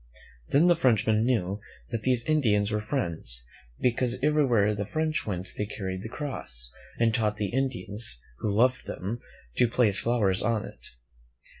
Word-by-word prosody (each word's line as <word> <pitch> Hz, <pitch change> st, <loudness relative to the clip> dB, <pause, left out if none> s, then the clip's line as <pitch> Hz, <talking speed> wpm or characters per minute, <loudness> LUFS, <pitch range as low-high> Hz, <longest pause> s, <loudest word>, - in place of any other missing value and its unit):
Then 150 Hz, +5 st, +5 dB
the 175 Hz, -1 st, +6 dB
Frenchmen 110 Hz, -6 st, +3 dB
knew 100 Hz, -6 st, +1 dB, 0.3 s
that 115 Hz, -, -2 dB
these 125 Hz, 0 st, +1 dB
Indians 110 Hz, -9 st, +2 dB
were 105 Hz, 0 st, 0 dB
friends, 85 Hz, -, -3 dB, 0.4 s
because 125 Hz, 0 st, +1 dB
every 150 Hz, 0 st, +4 dB
where 105 Hz, -4 st, +3 dB
the 100 Hz, -1 st, -2 dB
French 155 Hz, +5 st, -1 dB
went 95 Hz, -2 st, -3 dB
they 105 Hz, -, -2 dB
carried 95 Hz, -3 st, -4 dB
the 110 Hz, -, -6 dB
cross, -, -, -5 dB, 0.3 s
and 115 Hz, -1 st, +3 dB
taught 105 Hz, -3 st, +1 dB
the 100 Hz, -2 st, -1 dB
Indians, 115 Hz, -, -2 dB, 0.2 s
who 105 Hz, -, 0 dB
loved 125 Hz, +5 st, +2 dB
them, 105 Hz, +6 st, -4 dB, 0.4 s
to 125 Hz, -, +5 dB
place 110 Hz, -4 st, +2 dB
flowers 105 Hz, -6 st, +2 dB
on 115 Hz, -1 st, 0 dB
it. -, -, -11 dB
110 Hz, 160 wpm, -28 LUFS, 100-125 Hz, 0.4 s, the